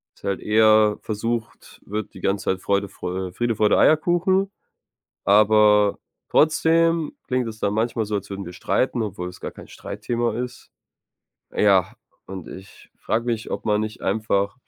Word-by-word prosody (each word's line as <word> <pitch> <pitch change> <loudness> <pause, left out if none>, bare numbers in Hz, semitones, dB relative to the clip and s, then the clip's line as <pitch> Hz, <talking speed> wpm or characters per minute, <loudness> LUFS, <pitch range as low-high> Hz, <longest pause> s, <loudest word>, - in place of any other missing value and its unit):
Ist - - -26
halt 100 -1 -1
eher 110 -1 +4
versucht 115 +1 -4
wird, 105 0 -5
die - - -10
ganze 95 0 -1
Zeit 95 - 0
Freude, 100 +1 0
Freu 90 0 -5
Friede, 120 +4 -1
Freude, 105 -1 +3
Eierkuchen, 175 +5 +3 0.7
aber 105 0 +4 0.3
trotzdem 165 +1 +2
klingt 125 -2 0
es 110 -1 -8
dann 100 -1 0
manchmal 115 +1 0
so, 105 0 -3
als 100 -1 -4
würden 100 0 -5
wir 85 - -7
streiten, 120 +7 -1
obwohl 90 -4 -4
es 90 - -13
gar - - -6
kein - - -13
Streitthema 120 0 -3
ist. 125 0 -6 0.9
Ja, 100 -3 +3 0.3
und 95 -2 -8
ich 95 +1 -13
frage 115 +1 -1
mich, 115 -2 -3
ob - - -4
man 105 0 +1
nicht 110 0 -5
einfach 100 -2 0
110 Hz, 160 wpm, -23 LUFS, 100-120 Hz, 0.9 s, eher